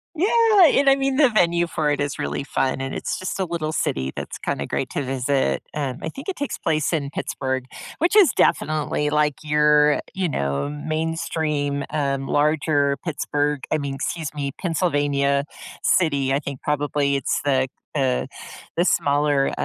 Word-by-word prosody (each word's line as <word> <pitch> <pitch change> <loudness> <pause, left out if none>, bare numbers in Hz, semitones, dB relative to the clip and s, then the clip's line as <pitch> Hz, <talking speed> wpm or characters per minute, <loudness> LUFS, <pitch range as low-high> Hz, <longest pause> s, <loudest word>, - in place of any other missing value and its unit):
Yeah, 420 +2 +5
and 280 -2 +4
I 270 - +6
mean, 275 -1 0
the 280 -2 +5
venue 175 -5 +2
for 155 -2 -1
it 145 -1 0
is 145 -1 -3
really - - -2
fun, 135 -1 -1
and 135 0 -4
it's - - -3
just 185 +1 -4
a 190 - +1
little 165 -3 -3
city 65 - -1
that's - - -6
kinda - - -3
great - - -2
to - - -2
visit. 130 - 0
Um, 140 -4 -3
I 160 - -3
think 270 - -10
it 385 - -2
takes 285 - -3
place 155 -3 0
in 150 -4 -1
Pittsburgh, 130 -2 -3 0.4
which 340 +5 +2
is 395 -6 +7
definitely, 150 -1 +1
like, 150 -1 +2
your, 150 -1 +3
you 190 -1 -1
know, 70 - -1
mainstream, 150 -2 -2
um, 140 -2 -1
larger 145 -1 +2
Pittsburgh 145 -3 -1
I - - +3
mean, 140 -2 -4
excuse 155 +3 -3
me, 140 -2 -3
Pennsylvania 145 -5 +1 0.4
city. 140 -6 +2
I 140 - +2
think 140 -2 -7
probably 145 -1 0
it's 135 - 0
the, 130 -2 +2 0.3
uh, 130 -3 +1 0.5
the 170 - +3
smaller 145 -3 +2
150 Hz, 170 wpm, -22 LUFS, 140-165 Hz, 0.5 s, is